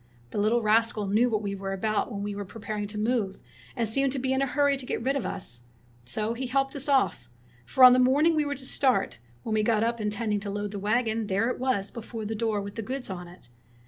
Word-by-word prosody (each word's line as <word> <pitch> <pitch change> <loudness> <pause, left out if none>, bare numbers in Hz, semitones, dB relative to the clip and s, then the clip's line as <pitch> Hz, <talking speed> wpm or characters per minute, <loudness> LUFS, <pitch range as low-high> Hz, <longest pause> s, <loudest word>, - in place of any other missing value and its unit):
The - - -2
little 220 +3 +2
rascal 220 0 +2
knew 215 +5 +3
what 215 -2 -1
we 200 -1 -2
were 195 0 -4
about 215 +4 -1
when 200 -2 -4
we 205 0 -3
were 205 0 -4
pre 215 +4 -11
paring 210 0 -3
to 210 +1 -7
move, 215 -3 0 0.4
and 235 -3 0
seemed 275 +5 +2
to - - -3
be 265 0 0
in 265 - +1
a 275 - +1
hurry 285 +1 +2
to 265 - -7
get - - -2
rid 270 +3 +1
of 275 - -1
us. 120 -9 -4 0.4
So 215 - -2
he 255 +2 -4
helped 270 +2 0
us 285 +1 -3
off; 195 - +2 0.4
for 260 - +3
on 250 -1 +11
the 255 - +4
morning 285 +6 +4
we 305 - +2
were 285 0 -2
to 265 -1 -6
start, 260 - +1 0.2
when 225 - -3
we 215 - +3
got 215 0 +2
up 235 0 -1
in 210 - 0
tending 210 -1 -1
to 200 0 -5
load 205 0 -3
the 205 - -5
wagon, 220 +1 0
there 200 +4 +1
it - - -6
was 250 -6 0
before 225 -1 -7
the 220 - -3
door 220 -2 -1
with 200 0 -7
the 225 - -4
goods 255 0 -5
on 180 -1 -6
it. 175 -8 -14
220 Hz, 265 wpm, -27 LUFS, 205-255 Hz, 0.4 s, on